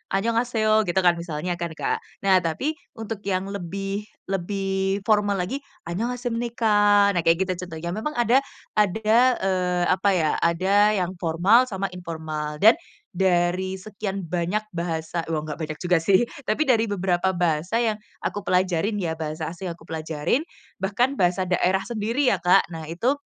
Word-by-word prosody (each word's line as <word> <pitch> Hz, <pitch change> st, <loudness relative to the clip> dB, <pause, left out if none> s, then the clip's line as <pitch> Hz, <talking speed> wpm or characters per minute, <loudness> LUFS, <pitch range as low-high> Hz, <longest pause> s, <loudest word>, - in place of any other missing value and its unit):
annyeonghaseyo 220 Hz, 0 st, +2 dB
gitu 175 Hz, -, -2 dB
kan, 175 Hz, -1 st, +4 dB
misalnya 170 Hz, +1 st, -4 dB
kan, 170 Hz, -2 st, -4 dB
Kak. -, -, -1 dB, 0.2 s
Nah, 190 Hz, -1 st, +5 dB
tapi 170 Hz, -, -1 dB, 0.2 s
untuk 225 Hz, -1 st, -5 dB
yang 190 Hz, 0 st, -1 dB
lebih 195 Hz, +2 st, -4 dB, 0.2 s
lebih 195 Hz, +1 st, -1 dB
formal 205 Hz, -2 st, +2 dB
lagi 185 Hz, +10 st, -2 dB, 0.3 s
annyonghashimnika 225 Hz, -1 st, +2 dB
nah 180 Hz, -, 0 dB
kayak 165 Hz, 0 st, +5 dB
gitu 185 Hz, -1 st, -4 dB
contohnya. 165 Hz, 0 st, -6 dB
Memang 220 Hz, +11 st, -3 dB
ada 240 Hz, +2 st, +4 dB, 0.4 s
ada, 215 Hz, +3 st, +3 dB, 0.2 s
eee, 180 Hz, -2 st, +1 dB
apa 190 Hz, +2 st, +2 dB
ya, 160 Hz, -4 st, +2 dB
ada 195 Hz, +5 st, +3 dB
yang 185 Hz, -2 st, -1 dB
formal 185 Hz, +10 st, +4 dB
sama 195 Hz, -3 st, -3 dB
informal. 160 Hz, -4 st, -5 dB
Dan, 225 Hz, +10 st, +7 dB, 0.3 s
dari 185 Hz, -1 st, +1 dB
sekian 195 Hz, 0 st, -5 dB
banyak 180 Hz, +5 st, 0 dB
bahasa 170 Hz, -2 st, -3 dB
woh 155 Hz, -, 0 dB
nggak 150 Hz, -1 st, -6 dB
banyak 155 Hz, -1 st, -5 dB
juga 180 Hz, -1 st, +3 dB
sih, 195 Hz, +8 st, +3 dB, 0.2 s
tapi 215 Hz, +7 st, 0 dB
dari 250 Hz, -7 st, +3 dB
beberapa 190 Hz, -2 st, 0 dB
bahasa 175 Hz, +5 st, 0 dB
yang 220 Hz, -3 st, 0 dB, 0.2 s
aku 205 Hz, -1 st, -3 dB
pelajarin 185 Hz, +2 st, +1 dB
ya, 160 Hz, -2 st, -2 dB
bahasa 155 Hz, 0 st, -4 dB
asing 175 Hz, +3 st, -8 dB
yang 175 Hz, -, -3 dB
aku 170 Hz, -, -21 dB
pelajarin, 160 Hz, -, -1 dB, 0.3 s
bahkan 240 Hz, +8 st, 0 dB
bahasa 180 Hz, +1 st, +2 dB
daerah 185 Hz, +1 st, +2 dB
sendiri, 235 Hz, +4 st, +1 dB
ya 195 Hz, -, +2 dB
Kak, 175 Hz, -1 st, +3 dB
nah 165 Hz, -2 st, -7 dB
itu 230 Hz, -, 0 dB
190 Hz, 155 wpm, -24 LUFS, 170-215 Hz, 0.4 s, Dan